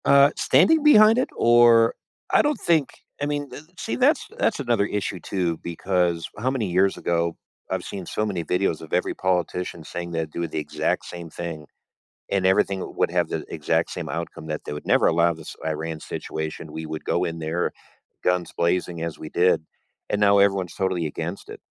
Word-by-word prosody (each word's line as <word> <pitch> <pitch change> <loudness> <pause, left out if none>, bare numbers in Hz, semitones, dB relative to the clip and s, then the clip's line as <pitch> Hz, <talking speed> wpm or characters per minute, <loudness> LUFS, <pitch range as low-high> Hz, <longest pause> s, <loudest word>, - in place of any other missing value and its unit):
Uh, 140 +1 +6
standing 190 - +4
behind 220 -6 +7
it? 255 - +1
Or 115 -1 +6 0.4
I - - +6
don't 295 -1 0
think 160 -5 +2 0.3
I - - +1
mean 145 -1 -2
d 125 - -8 0.2
see, - - -3
that's 275 +5 +3
that's 225 - +1
another 120 -6 +1
issue 100 -2 -3
too 85 -1 -2
because 85 -1 0
how 125 +4 0
many 130 -5 -1
years 95 +2 +2
ago 85 -1 0 0.3
I've - - -2
seen 95 -3 -6
so 105 - -2
many 95 -5 -2
videos 90 0 0
of 80 - -11
every 90 - +1
politician 90 -2 -1
saying 85 +2 -6
they'd 80 -2 -3
do 85 +1 -3
the 80 - -3
exact 75 - -1
same 85 -1 -8
thing, 80 -2 -6 0.6
and 95 -2 +1
everything 95 0 +2
would - - +1
have - - +1
the - - -3
exact - - 0
same - - -5
outcome 85 -1 -5
that 75 -1 -3
they - - -4
would 75 - -7
never - - +4
allow 85 +1 +3
this 80 -1 -10
Iran 80 0 -3
situation. 80 0 -5
We 80 - -6
would 80 0 -6
go - - +1
in 85 0 -4
there 80 +2 -1 0.5
guns 90 -1 +1
blazing 85 0 0
as 85 -1 -4
we 80 - -7
did, 90 +1 +3 0.5
and 105 - 0
now 100 0 +5
everyone's 95 -3 +2
totally 95 -3 0
against 80 +4 -5
it. - - -9
90 Hz, 190 wpm, -24 LUFS, 85-110 Hz, 0.6 s, behind